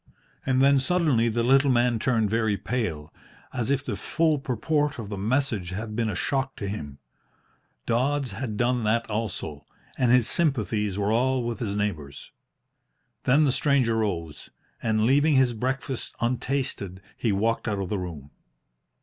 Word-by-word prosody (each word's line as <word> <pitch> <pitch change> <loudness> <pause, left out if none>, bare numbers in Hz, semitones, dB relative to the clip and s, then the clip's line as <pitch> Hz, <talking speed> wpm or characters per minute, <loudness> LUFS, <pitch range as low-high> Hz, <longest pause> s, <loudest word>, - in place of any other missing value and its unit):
And 130 0 +3
then 140 0 +5
suddenly 135 -6 +2
the 115 +1 0
little 135 +3 +4
man 120 -2 +2
turned 115 -3 +1
very 110 -1 +1
pale, 90 -9 -3 0.4
as 125 -1 -2
if 140 0 0
the - - -2
full 155 +8 +1
purport 145 +2 -1
of 110 -4 -6
the 100 - -4
message 110 -4 0
had 105 +3 -5
been 115 -1 0
a 100 - -3
shock 135 +6 -1
to 100 - -5
him. 75 -9 -6 0.9
Dodds 130 +2 0
had 110 +1 -4
done 125 0 +1
that 115 +2 +1
also, 95 -9 -3 0.4
and 125 -2 +3
his 125 -2 +5
sympathies 110 - +1
were 100 +1 0
all 130 +2 +2
with 120 0 -3
his 105 -5 -2
neighbours. 80 -10 -4 0.9
Then 140 +5 +5
the 140 - +3
stranger 130 -5 +2
rose, 85 -8 -3 0.3
and, 110 -1 +1
leaving 145 +4 +4
his 130 -2 +4
breakfast 130 +2 -3
untasted, 120 -6 -2
he 115 - 0
walked 115 +5 0
out 105 -2 0
of 95 -2 -3
the 105 - -1
room. 80 -6 -7
115 Hz, 160 wpm, -26 LUFS, 105-130 Hz, 0.9 s, then